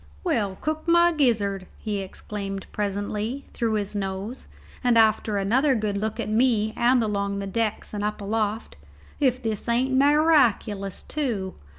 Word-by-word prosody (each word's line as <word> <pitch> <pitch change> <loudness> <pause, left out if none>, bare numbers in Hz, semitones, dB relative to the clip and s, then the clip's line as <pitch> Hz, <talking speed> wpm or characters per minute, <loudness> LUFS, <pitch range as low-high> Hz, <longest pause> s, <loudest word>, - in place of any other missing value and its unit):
"Well, 200 -4 0
cook 315 +2 -3
my 340 +1 +5
gizzard," 210 - +1
he 210 -2 -3
exclaimed 195 0 -5
presently, 210 +5 -3
through 230 -2 -1
his 205 -2 -1
nose, 200 +4 -4 0.4
and 245 -2 +4
after 220 -1 +3
another 255 +8 +2
good 210 -3 -1
look 215 +2 -2
at - - -2
me 220 -1 +2
and 245 0 +3
along 200 -2 -1
the 200 - -3
decks 215 +2 -2
and 205 -1 -3
up 210 +1 -2
aloft, 215 - -2 0.4
"if 255 -3 +1
this 220 0 -3
ain't 250 +3 +2
mi 280 +3 +5
raculous, 230 - +2
tew. 230 -11 -2
215 Hz, 155 wpm, -25 LUFS, 200-250 Hz, 0.4 s, my